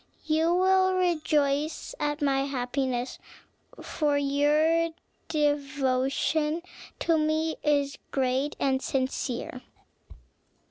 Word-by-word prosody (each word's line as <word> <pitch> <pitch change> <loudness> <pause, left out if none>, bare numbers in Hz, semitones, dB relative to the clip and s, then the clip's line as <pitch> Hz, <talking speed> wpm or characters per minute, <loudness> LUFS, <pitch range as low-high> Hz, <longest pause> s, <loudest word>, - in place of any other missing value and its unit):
You 320 +2 +2
will 375 0 +3
rejoice 305 -4 0
at 295 0 -1
my 275 -1 +2
happiness; 255 -1 -2 0.6
for 295 -2 0
your 300 +4 +2 0.4
devotion 290 +1 0 0.4
to 330 -1 +2
me 315 +1 0
is 285 -2 +1
great 265 +2 0
and 265 -1 +1
sincere." 260 -2 -2
290 Hz, 85 wpm, -27 LUFS, 275-315 Hz, 0.6 s, will